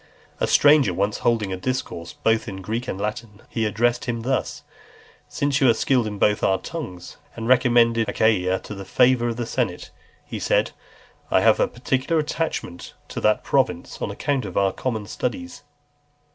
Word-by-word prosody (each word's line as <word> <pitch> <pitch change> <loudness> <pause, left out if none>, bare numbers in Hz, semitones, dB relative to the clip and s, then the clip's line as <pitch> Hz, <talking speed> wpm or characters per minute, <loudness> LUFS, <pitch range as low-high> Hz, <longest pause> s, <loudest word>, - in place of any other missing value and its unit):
A - - +1
stranger 145 - +5
once 100 +3 -1
holding 110 -5 0
a - - -3
discourse 90 -6 -4
both 115 0 0
in 95 -1 -7
Greek 115 +5 -3
and 95 - -4
Latin, 105 0 -5
he 115 - -1
addressed 120 +3 0
him 115 -2 -2
thus; 130 +1 -2 0.7
"Since 145 0 0
you 130 - +6
are 115 - +4
skilled 125 -1 +1
in 105 -1 -5
both 105 +1 +2
our 95 - +3
tongues." 95 - -7 0.2
And 115 -1 -5
recommending 120 -2 +4
Achaia 100 -3 +2
to - - -8
the 100 -1 -7
favour 125 +4 +3
of 115 -1 -3
the 120 - -2
senate, 115 -7 -3 0.3
he - - -6
said, - - +1 0.6
"I - - +3
have - - +4
a - - +3
particular 130 +6 -1
attachment 150 - -4
to - - -5
that - - +2
province, - - -1
on - - -2
account 140 -2 -1
of 95 -4 -6
our 95 -1 +2
common 110 -5 -3
studies." 260 - -4
115 Hz, 175 wpm, -23 LUFS, 100-130 Hz, 0.7 s, you